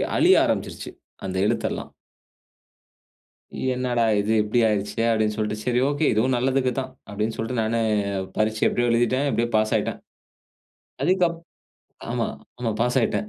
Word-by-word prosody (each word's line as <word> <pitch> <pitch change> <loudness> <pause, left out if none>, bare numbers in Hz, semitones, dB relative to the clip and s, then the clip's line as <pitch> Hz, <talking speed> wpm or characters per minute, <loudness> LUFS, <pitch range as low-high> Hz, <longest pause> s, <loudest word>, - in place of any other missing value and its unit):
அழிய - - +6
ஆரம்பிச்சுருச்சு. - - -3 0.3
அந்த 95 0 -4
எழுத்தெல்லாம். - - -2 1.8
"என்னடா 125 -2 0 0.2
இது. 105 +2 0
இப்டி 105 +3 0
ஆயிடுச்சே!" 105 +2 -1
அப்டினு 110 -1 +1
சொல்ட்டு, 105 0 -1
"சரி 125 0 +1
ஓகே. 145 +2 0
இதுவும் 125 +4 +2
நல்லதுக்கு 130 +1 +1
தான்" 130 0 -6 0.2
அப்டின்னு 105 +2 -2
சொல்ட்டு, 115 +2 -2
நானு 115 +1 0 0.6
பரீட்சை 110 0 0
எப்படியோ 120 0 0
எழுதிட்டேன். 120 +4 +2
எப்படியோ 120 +1 0
பாஸ்சாயிட்டேன். 110 0 0 1.0
அதுக்கப் 175 0 +2 0.7
ஆமா. - - 0 0.3
ஆமா, 120 -2 -1
பாஸ் 125 +2 +1
ஆயிட்டேன். 125 - 0
120 Hz, 125 wpm, -24 LUFS, 110-130 Hz, 1.8 s, அழிய